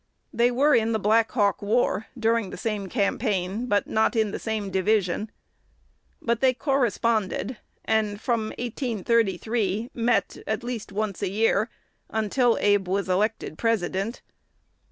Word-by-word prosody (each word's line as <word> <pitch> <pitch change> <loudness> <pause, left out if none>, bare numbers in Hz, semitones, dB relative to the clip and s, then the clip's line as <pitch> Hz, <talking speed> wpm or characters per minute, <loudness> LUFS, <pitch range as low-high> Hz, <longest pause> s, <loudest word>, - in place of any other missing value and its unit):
They 240 +1 +3
were 280 +5 +3
in 225 0 +3
the 220 - +1
Black 220 +2 +3
Hawk 205 -6 +2
War 220 0 +1
during 230 -3 +1
the - - -7
same 210 -4 -3
campaign, 205 0 -1
but 205 -3 +2
not 220 +3 +1
in 220 -2 +2
the - - -4
same 215 -3 -3
division. 195 +1 +1 0.9
But 235 -1 -1
they 260 -1 +4
corresponded, 235 -4 0 0.3
and, 215 -2 +1
from 230 -1 0
1833, 225 -2 -1
met 240 +1 0
at - - -2
least 240 -4 -5
once 205 -1 -3
a 200 - 0
year, 215 +2 +2 0.4
until 225 +3 +2
Abe 205 -2 +2
was 190 +1 -1
elected 195 -3 -1
President. 225 0 -1
220 Hz, 135 wpm, -25 LUFS, 200-235 Hz, 0.9 s, they